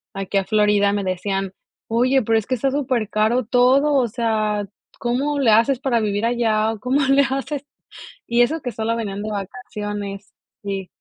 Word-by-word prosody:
aquí 195 0 -2
a 195 - +1
Florida, 210 0 +3
me 205 -1 -1
decían: 195 +1 -2 0.3
"Oye, 255 +4 +2
pero 225 +1 +2
es 215 - -8
que 255 - 0
está 265 +3 0
supercaro 240 -3 0
todo, 260 +5 +3
o 260 -4 +3
sea, 215 -3 -1 0.3
¿cómo 275 +5 -1
le 250 -5 +4
haces 230 +4 +4
para 255 -3 +1
vivir 210 0 -1
allá 225 -2 +1
o 225 - -7
cómo 255 +6 +1
le 275 +1 +4
hacen?", 275 +2 -3 0.7
y 235 +1 +4
eso 315 +7 0
que 250 - -4
solo 225 +1 -2
venían 205 -4 -4
de 215 - -4
vacaciones, 205 -1 -6 0.3
sí. 195 -2 -4
225 Hz, 175 wpm, -21 LUFS, 205-255 Hz, 0.7 s, le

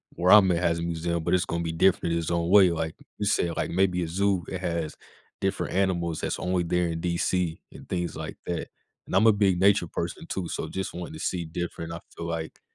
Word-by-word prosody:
where 90 +1 +3
I'm 100 -3 +8
at 85 - +2
has 85 -1 +1
a - - -3
museum, 85 0 -2
but - - 0
it's 90 - +3
gonna 85 0 -2
be 80 - -2
different 85 0 +2
in 85 - +1
its 80 - -3
own 85 0 0
way. 95 -1 +7
Like, 80 -1 -2 0.2
you 105 - -2
say, 95 -4 +2
like, - - -2
maybe 90 0 +2
a - - -3
zoo 95 +1 +1
that 95 - -4
has 85 -4 -2 0.4
different 95 -1 -1
animals 85 -4 0
that's - - -2
only 90 -1 0
there 90 +1 +1
in 80 0 -3
DC 85 -1 0
and - - -12
things 90 -1 -2
like - - -6
that. 85 -2 -3 0.4
And - - -3
I'm 100 +4 +5
a - - +9
big 100 -3 +2
nature 100 -2 +4
person - - -4
too, 95 -3 -3
so - - -3
just 95 -1 -4
wanting 85 -2 -6
to 80 - -8
see 85 0 -2
different, 85 0 -5
I 85 - -5 0.2
feel 85 - -5
like 80 -1 -4
85 Hz, 240 wpm, -27 LUFS, 85-95 Hz, 0.4 s, a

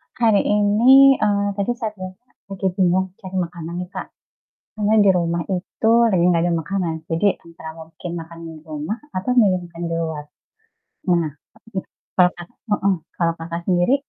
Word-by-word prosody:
Hari 225 -4 +4
ini, 235 +7 +6
eee, 205 -1 +1
tadi 200 +4 0
saya 225 -3 -3
bilang 185 -1 -8 0.3
lagi 195 -1 -2
bingung 185 0 +2
cari 190 -3 -8
makanan 170 0 -8
nih, 180 - -12
Kak. - - -6 0.7
Karena 210 0 +1
di - - +6
rumah 170 0 0
itu 190 +4 -1 0.2
lagi 185 -5 +2
enggak 170 -2 +3
ada - - +1
makanan, 180 0 -2 0.2
jadi 165 +5 +2 0.2
antara 165 -1 -10
mungkin 165 +2 -9
makan 165 0 -9
di 165 - -8
rumah 155 +7 -4 0.2
atau 185 +6 -1
milih 200 -6 +5
mau - - -9
makan 170 0 -8
di - - -2
luar. 160 -2 -3 0.9
Nah 170 -2 +2 0.5
mhm, 190 - -2 0.3
kalau, 180 -1 +6
Kakak 175 - -9 0.3
mhm, 200 -1 +2 0.2
kalau, 170 -1 +1
Kakak, 170 +1 -5
sendiri? 180 +7 +3
185 Hz, 170 wpm, -21 LUFS, 170-205 Hz, 0.9 s, ini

